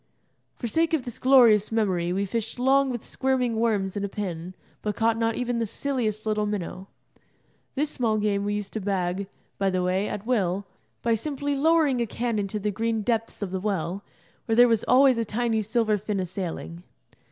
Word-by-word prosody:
For - - -6
sake 325 +7 +2
of 275 - -3
this 245 - -7
glorious 240 -6 +5
memory 185 -6 +1
we 195 +2 0
fished 225 +4 -3
long 270 +2 +3
with 240 -3 -4
squirming 255 -3 0
worms 210 -4 0
and 205 - -2
a 200 - -2
pin, 185 -3 -5 0.3
but 210 -1 -2
caught 225 +1 +2
not 225 0 0
even 245 -1 -1
the 230 - -1
silliest 225 -4 -2
little 210 -1 0
minnow. 195 -2 -4 0.9
This 295 +2 0
small 225 -3 0
game 205 -1 0
we 205 0 -1
used 205 -1 -5
to 220 - -3
bag, 190 -1 -1 0.3
by 195 -1 +2
the 185 -1 0
way, 185 +3 0
at 205 0 -5
will, 200 -5 0 0.4
by 235 - +2
simply 285 +4 -2
lowering 295 -3 +3
a 235 - 0
can 230 0 -2
into 200 +1 -2
the 210 0 -1
green 225 +1 -1
depths 225 -1 -1
of 190 - -4
the 190 - -2
well, 195 -1 -2 0.4
where 225 - +2
there 245 +1 +7
was 225 -3 +2
always 260 -1 +5
a - - +1
tiny 225 +1 0
silver 215 0 +1
fin 205 0 -2
a 185 - -1
sailing. 170 -2 -5
215 Hz, 200 wpm, -26 LUFS, 200-240 Hz, 0.9 s, there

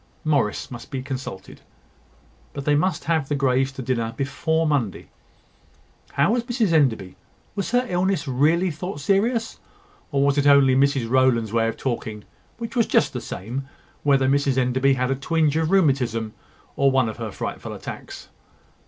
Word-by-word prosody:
Morris 140 -10 0
must 120 - -9
be 130 -1 -4
consulted; 130 -8 -7 0.9
but 140 -1 -6
they 150 - +3
must 170 +6 +1
have 160 -3 0
the 145 - +1
Greys 135 -1 +1
to 135 -1 -7
dinner 115 -2 -2
before 160 +4 0
Monday. 135 - -1 1.0
How - - +3
was 240 +1 +1
Mrs 235 -6 0
Enderby? 115 - +1 0.4
Was 200 -3 -2
her 245 +1 +2
illness 180 -4 0
really 160 +8 +2
thought 160 0 -6
serious, 225 - 0 0.5
or 140 -1 +2
was 140 0 +2
it 145 - +2
only 140 -2 +6
Mrs 135 -3 +2
Rowland's 120 -3 +2
way 115 -1 +2
of 115 - -3
talking, 110 -4 -4 0.3
which 230 +1 -6
was 235 -2 +2
just - - +2
the - - -4
same, 125 +8 -6 0.3
whether 135 -2 +3
Mrs 140 -1 +2
Enderby 130 +2 +2
had 130 0 -1
a - - +1
twinge 155 +2 +1
of 160 0 +1
rheumatism 130 - +1 0.4
or 140 - +3
one 130 -3 +2
of 110 - -5
her 115 -1 -4
frightful - - -5
attacks? - - -8
140 Hz, 165 wpm, -23 LUFS, 125-160 Hz, 1.0 s, only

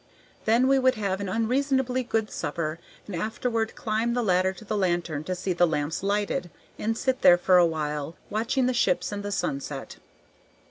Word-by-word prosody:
Then 235 +4 +4
we 270 0 +4
would 260 0 +3
have 200 -2 -2
an 200 - -3
unreasonably 255 +4 +1
good 225 -3 -1
supper 155 +1 -3 0.3
and 200 - -6
afterward 225 +3 -2
climb 225 +2 -1
the 245 - +1
ladder 185 -2 +2
to 190 +3 -13
the 215 - -2
lantern 175 -6 0
to 185 - -2
see 180 +1 -2
the 175 0 +3
lamps 150 0 -2
lighted, 200 -2 -1 0.3
and 225 +1 -1
sit 260 +1 0
there 175 - +8
for 180 +1 +4
a 175 - +6
while 150 -1 -3 0.2
watching 235 +5 +1
the 255 - +1
ships 240 - +1
and 205 0 -4
the 205 0 -4
sunset. 140 -7 -3
205 Hz, 185 wpm, -26 LUFS, 175-230 Hz, 0.3 s, there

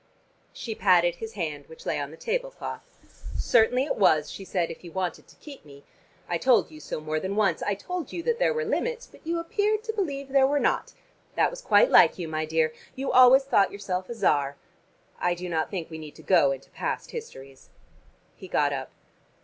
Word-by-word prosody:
She 225 - -6
patted 175 -4 +3
his 225 +3 -7
hand 150 -7 -4
which 160 - -14
lay - - -1
on 140 -1 -4
the 160 - -12
table - - -2
cloth. - - -7 0.6
"Certainly 245 +2 +3
it 290 - -2
was," 155 -7 +3
she 195 - -8
said, 180 -3 -1
"if - - -11
you 170 - -10
wanted 185 -1 -3
to - - -19
keep 290 -3 -12
me. 140 -1 -15 0.4
I 175 -1 -1
told 250 -7 +3
you 155 - -11
so 155 - -5
more 155 0 -2
than 190 +4 -3
once. 195 -6 +2
I 205 - 0
told 345 - -5
you 340 - -5
that 470 +3 0
there - - +3
were 470 -1 -1
limits, 480 +1 -2
but - - -19
you 335 +1 0
appeared 420 +5 0
to 445 -1 -3
believe 285 -10 -3
there 270 0 +4
were 290 +1 +1
not. - - 0 0.4
That - - +3
was - - -8
quite - - +4
like - - +6
you, 175 -3 -4
my 155 0 -2
dear. 160 0 +1 0.2
You 270 +1 -2
always 255 +2 +7
thought 205 -8 +3
yourself 185 -2 -4
a 235 - -5
Czar. 145 -9 +1 0.6
I 175 0 +1
do 180 +1 -6
not 160 -2 -1
think 175 -5 -5
we 160 - -7
need 155 -2 -10
to - - -14
go 165 -7 +4
into 135 0 -7
past - - -4
histories." 135 - -10 0.7
He - - -11
got - - +1
up. - - -4
195 Hz, 215 wpm, -26 LUFS, -, 0.7 s, always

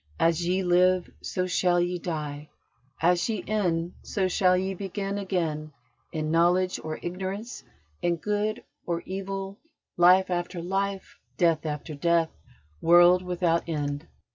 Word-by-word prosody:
"As 165 +1 +2
ye 185 +2 +1
live, 180 0 +3
so 185 - -2
shall 180 -1 +2
ye 175 0 0
die; 150 -3 -5 0.5
as 175 +4 +3
ye 210 -5 -2
end, 175 -5 0
so 195 -3 -1
shall 185 0 +3
ye 190 +1 -1
begin 195 +1 -4
again 160 -6 -2 0.4
in 155 -1 -2
knowledge 180 +3 +3
or 155 0 -4
ignorance, 190 - -5 0.4
in 175 0 +1
good 210 +5 -2 0.2
or 170 -1 -1
evil, 195 +1 -5 0.4
life 185 +2 +6
after 175 0 -2
life, 195 +2 -3 0.2
death 165 -3 +2
after 150 +1 -4
death, 165 +2 +2 0.5
world 175 +2 +6
without 175 -2 0
end." 145 -1 -3
180 Hz, 135 wpm, -27 LUFS, 165-190 Hz, 0.5 s, life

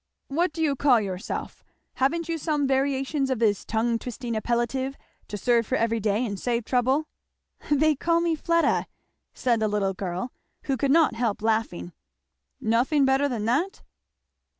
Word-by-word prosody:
"What 335 +5 +1
do 320 +1 -2
you 290 -3 +2
call 260 -3 +4
yourself? 190 -3 -5 0.3
Haven't 315 +5 +1
you 330 -1 -2
some 295 -2 0
variations 270 +1 0
of 260 - 0
this 215 -3 +1
tongue 230 +1 0
twisting 245 0 -5
appellative 240 +4 -1 0.3
to 205 - -5
serve 235 0 +2
for 260 - 0
every 230 -2 +1
day 215 +3 0
and 200 -4 -4
save 235 -2 -1
trouble?" 260 +5 +1 0.6
"They 305 +1 +4
call 335 +3 +2
me 340 -1 +1
Fleda," 335 +2 +1 0.5
said 240 -3 +1
the 220 - +1
little 205 -2 0
girl, 185 +5 -4 0.3
who 270 - 0
could 270 +2 0
not 320 0 +4
help 225 -3 -2
laughing. 220 - -1 0.7
"Nothing 250 +6 +2
better 270 +2 +2
than 225 -5 -3
that?" 290 - 0
250 Hz, 160 wpm, -26 LUFS, 225-285 Hz, 0.7 s, call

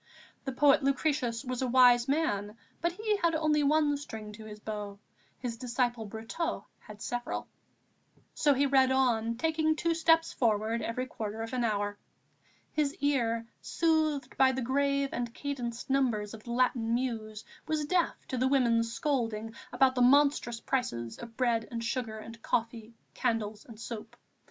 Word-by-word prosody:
The 270 - -2
poet 275 +2 +4
Lucretius 275 -3 0
was 255 0 -3
a 260 - +1
wise 245 -1 +6
man, 220 -8 0 0.2
but 340 +1 +1
he 425 +2 0
had 335 -4 +1
only 310 -1 +2
one 295 0 +3
string 220 -7 -8
to 215 +1 -10
his 210 -1 -9
bow; 210 -2 -5 0.4
his 240 -3 -4
disciple 240 -2 -1
Brotteaux 225 - -4
had 210 -1 -11
several. 245 0 -3 0.9
So 290 -2 +3
he 280 +2 +3
read 265 -1 +4
on, 230 -3 +2
taking 315 +2 +1
two 335 +1 +1
steps 325 0 +3
forward 225 -1 +1
every 250 +3 -2
quarter 220 -3 -5
of 225 - -7
an 250 -1 0
hour. 205 -2 -1 0.7
His 295 -1 0
ear, 240 -8 0 0.2
soothed 315 -3 0
by 265 -1 +6
the 260 0 -2
grave 280 +2 +1
and 240 -1 -3
cadenced 245 -5 -4
numbers 240 -6 +1
of 220 -1 -11
the 235 - -6
Latin 235 -2 +1
Muse, 220 -4 -3 0.2
was 310 -1 0
deaf 350 +2 +1
to 255 - -2
the 260 - +3
women's 235 -4 +2
scolding 225 -5 -1 0.2
about 265 -1 +4
the 250 - 0
monstrous 265 -2 +4
prices 120 - -2
of 230 -1 -10
bread 235 -3 +1
and 230 -1 -4
sugar 230 -2 -2
and 225 +1 -10
coffee, 230 0 -2 0.2
candles 220 -4 -2
and 225 -3 -12
soap. 230 -2 -7
245 Hz, 160 wpm, -30 LUFS, 225-280 Hz, 0.9 s, wise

